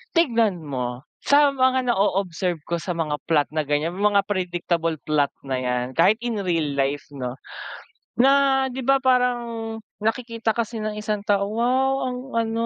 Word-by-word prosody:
tignan 230 - +2
mo 125 -2 -4 0.2
sa 285 0 +5
mga 260 -1 +2
na-o-observe 185 -4 0
ko 170 0 -2
sa 175 +2 -4
mga 150 -3 -1
plot 150 -3 +2
na 155 0 -1
ganyan. 160 +6 -1
Mga 205 -1 +3
predictable 175 -4 -1
plot 150 -2 +2 0.2
na 135 -1 -1
yan. 125 -1 -1
Kahit 175 +9 +4
in 230 -4 -2
real 165 -5 0
life, 140 +1 0
no, 125 -2 -5 0.9
na, 270 0 +4
di 255 0 -5
ba, 270 0 +3
parang 240 -3 0 0.2
nakikita 230 +1 -1
kasi 230 -1 -3
ng 215 - -2
isang 210 -1 -2
tao, 200 -1 +2
"Wow 255 +4 +1 0.2
ang 250 - -5 0.2
ano 230 0 0
205 Hz, 155 wpm, -23 LUFS, 160-240 Hz, 0.9 s, sa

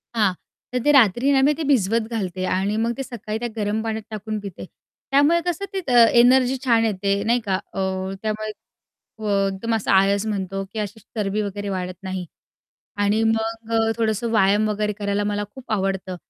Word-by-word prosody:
हां, 205 -4 +3 0.4
तर 250 - 0
ते 295 - +4
रात्री 250 0 +4
ना 270 -1 +4
मी 295 +2 +4
ते 325 - -2
भिजवत 230 -3 +2
घालते 185 -5 -2
आणि 195 +3 0
मग 230 - +1
ते 270 - -3
सकाळी 230 -4 -5
त्या 240 - -2
गरम 210 0 -1
पाण्यात 220 -1 -3
टाकून 215 0 -4
पिते. 200 -3 -8 0.5
त्यामुळे 290 +5 +4
कसं 355 +2 -2
ते 385 - -1
अ, 245 -2 +3 0.2
एनर्जी 255 +2 +5
छान 230 -2 +4
येते 200 -2 -1
नाही 235 +3 +2
का. 190 -2 +1 0.2
अ, 195 - -4 0.4
त्यामुळे 215 0 -2 0.7
अ, 215 - -3 0.3
एकदम 225 +4 -2
असं 220 - -1
आळस 195 +2 +3
म्हणतो 195 -2 -3
की 220 - -3
अशी 210 +1 -4
चरबी 210 -1 -3
वगैरे 205 0 -4
वाढत 185 -1 -3
नाही. 190 -1 -4 0.7
आणि 205 +2 +2
मग 225 0 -1
अ, 225 0 +2
थोडंसं 225 0 0
व्यायाम 210 0 +3
वगैरे 210 0 -1
करायला 200 0 0
मला 205 0 -1
खूप 265 -3 -10
आवडतं. 195 -2 -1
215 Hz, 185 wpm, -22 LUFS, 200-230 Hz, 0.7 s, एनर्जी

